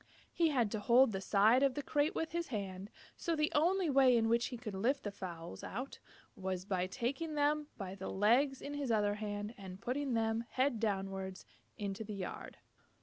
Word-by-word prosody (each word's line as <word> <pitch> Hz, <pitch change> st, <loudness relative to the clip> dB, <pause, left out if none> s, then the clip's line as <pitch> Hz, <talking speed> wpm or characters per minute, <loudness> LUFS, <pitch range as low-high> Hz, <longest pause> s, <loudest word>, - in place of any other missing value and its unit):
He 335 Hz, -, +3 dB
had 245 Hz, -8 st, +1 dB
to 220 Hz, -, -1 dB
hold 240 Hz, +4 st, +5 dB
the 195 Hz, -2 st, -3 dB
side 215 Hz, +6 st, +4 dB
of 275 Hz, -2 st, +3 dB
the 290 Hz, -, -3 dB
crate 290 Hz, +2 st, +1 dB
with 325 Hz, -, -2 dB
his 340 Hz, 0 st, -2 dB
hand, 195 Hz, -4 st, -4 dB, 0.3 s
so 335 Hz, -, -1 dB
the 300 Hz, 0 st, +1 dB
only 350 Hz, +4 st, +3 dB
way 265 Hz, -4 st, +5 dB
in 225 Hz, -1 st, +2 dB
which 235 Hz, +1 st, +3 dB
he 245 Hz, -, -6 dB
could 225 Hz, -3 st, -6 dB
lift 250 Hz, +9 st, 0 dB
the 205 Hz, -, -3 dB
fowls 170 Hz, -, -7 dB
out 255 Hz, +6 st, -5 dB, 0.4 s
was 185 Hz, -1 st, -3 dB
by 185 Hz, -2 st, 0 dB
taking 275 Hz, -, -3 dB
them 295 Hz, +1 st, +2 dB
by 190 Hz, -3 st, -5 dB
the 195 Hz, -1 st, -6 dB
legs 250 Hz, +7 st, +3 dB
in 285 Hz, -, -5 dB
his 285 Hz, -4 st, -2 dB
other 205 Hz, -2 st, +2 dB
hand 205 Hz, +1 st, -4 dB
and 190 Hz, -1 st, -8 dB
putting 260 Hz, +3 st, -1 dB
them, 225 Hz, 0 st, +1 dB
head 260 Hz, -3 st, +1 dB
downward, 195 Hz, -3 st, -2 dB, 0.3 s
into 200 Hz, +1 st, -3 dB
the 210 Hz, -1 st, -6 dB
yard. 190 Hz, -2 st, -6 dB
225 Hz, 200 wpm, -35 LUFS, 195-275 Hz, 0.4 s, hold